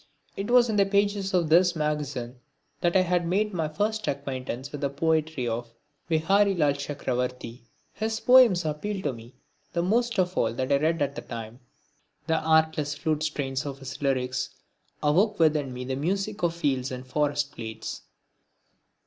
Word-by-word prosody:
It 200 +3 -4
was 245 0 +6
in 215 -2 -1
the 200 - +5
pages 200 -1 +1
of 175 -4 +1
this 175 +2 +5
magazine 145 -5 -3 0.4
that 175 +1 +1
I 180 -1 +3
made 195 +5 0
my 165 -3 -1
first 210 +7 -2
acquaintance 135 -1 -4
with 145 - -6
the 140 - 0
poetry 155 -2 0
of 115 0 -4 0.3
Viharilal 170 -1 +3
Chakravarti. 125 -4 -3 0.3
His 220 +1 -2
poems 245 -9 +6
appealed 190 +6 -3
to 145 - 0
me 115 +1 -13 0.4
the 170 - 0
most 235 +5 +1
of 185 0 +1
all 115 0 +1
that 130 +3 -2
I 140 - +5
read 160 +1 +1
at 140 0 -2
the - - -6
time. 115 0 -8 0.7
The 160 -1 +1
artless 160 -2 +2
flute 155 -2 -1
strains 140 -4 -2
of 140 -2 -5
his 135 0 -8
lyrics 130 -2 0 0.5
awoke 195 +9 +3
within 150 -4 +2
me 125 0 -6
the 130 +1 -2
music 195 +8 -2
of 170 -1 +1
fields 135 -6 -1
and 130 0 -6
forest 145 +1 0
glades. 110 -1 -6
150 Hz, 165 wpm, -26 LUFS, 135-185 Hz, 0.7 s, was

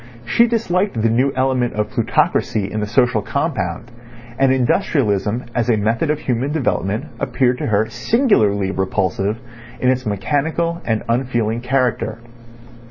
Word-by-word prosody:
She 235 - +4
disliked 200 - 0
the 115 - +3
new 130 +4 +2
element 130 -2 +1
of 105 0 -2
plutocracy 100 -2 0
in 110 - -2
the 105 - -2
social 125 -1 +2
compound, 115 - -3 0.5
and 135 -1 +4
industrialism 120 - +1
as 120 0 0
a 115 - +3
method 115 +8 0
of 150 0 0
human 130 +3 -1
development 105 - -1
appeared 125 -2 +1
to - - -2
her 110 0 +2
singularly 110 - +2
repulsive 95 +2 -1 0.4
in 125 +1 +3
its 130 0 -1
mechanical 155 - -1
and 110 -2 0
unfeeling 120 -2 0
character. 125 -2 0
120 Hz, 140 wpm, -19 LUFS, 105-135 Hz, 0.5 s, She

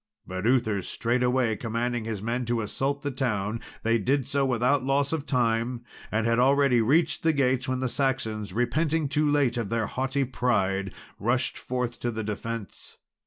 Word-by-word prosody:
But 95 +3 -3
Uther 110 -6 +2
straightway 125 +2 +1
commanding 115 +1 -2
his 105 -3 -4
men 120 +3 -1
to 120 0 0
assault 135 +6 -2
the 145 - -1
town, 115 -4 -1 0.2
they 115 +1 +2
did 135 +4 +1
so 140 0 +1
without 125 +3 +2
loss 140 +2 +1
of 155 -2 -3
time, 120 -1 0 0.3
and 110 +1 0
had 115 +1 +2
already 135 -1 +4
reached 150 +8 +2
the 160 -1 +3
gates, 130 -2 +1
when 130 0 -1
the 130 - +1
Saxons, 120 -6 -1
repenting 155 +6 +1
too 150 +2 +1
late 140 -4 +2
of 115 -4 -2
their 115 0 0
haughty 130 +4 -1
pride, 100 -7 0 0.3
rushed 120 +5 0
forth 125 -1 -3
to 120 - -1
the 110 -1 -3
defence. 110 0 -6
125 Hz, 170 wpm, -27 LUFS, 115-135 Hz, 0.3 s, already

